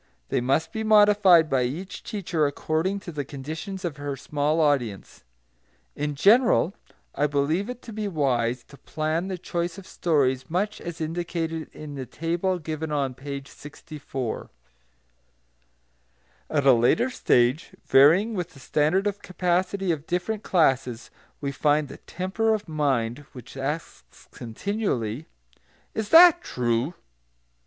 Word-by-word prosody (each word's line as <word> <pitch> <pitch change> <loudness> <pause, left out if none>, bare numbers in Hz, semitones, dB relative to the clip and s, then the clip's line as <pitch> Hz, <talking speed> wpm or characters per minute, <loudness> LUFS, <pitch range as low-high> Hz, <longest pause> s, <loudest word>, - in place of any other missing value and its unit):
They - - 0
must 140 +6 0
be 220 - -3
modified 205 -6 +6
by 135 -3 +1
each 155 +11 -4
teacher 175 -8 -1
according 160 +7 -1
to 175 - -8
the 150 -3 -3
conditions 160 +8 -6
of 155 -5 -4
her 145 -1 -4
small 150 +3 -1
audience. 135 -10 0 0.7
In 150 0 -3
general, 215 - +4 0.4
I 150 - +1
believe 150 - 0
it 250 0 -7
to 230 - -9
be 210 0 -3
wise 125 -8 0
to 140 - -14
plan 155 +3 -2
the 190 -1 -4
choice 175 0 -3
of 195 - -10
stories 135 -8 0
much 195 +6 -1
as 170 -1 -7
indicated 165 0 -3
in 150 -1 -9
the 135 -3 -6
table 170 +7 -1
given 155 -1 -5
on 140 -3 0
page 140 +1 -7
64. 145 -5 -7 2.0
At 145 -3 0
a 135 - +8
later 125 - +3
stage, 125 - +1
varying 170 +12 +5
with 180 -5 -4
the - - -13
standard 155 +9 +1
of 205 0 -2
capacity 185 +1 0
of 155 -1 -4
different 190 +4 -2
classes, 130 - +1 0.3
we 140 -1 -2
find 145 +1 +1
the - - -9
temper 220 +5 -1
of 210 -2 -7
mind 135 -6 0
which 125 -2 -11
asks 135 - -6
continually, 125 - -3 0.7
"Is 220 -2 -3
that 345 +1 +8
true?" 120 - -1
155 Hz, 140 wpm, -25 LUFS, 140-185 Hz, 2.0 s, a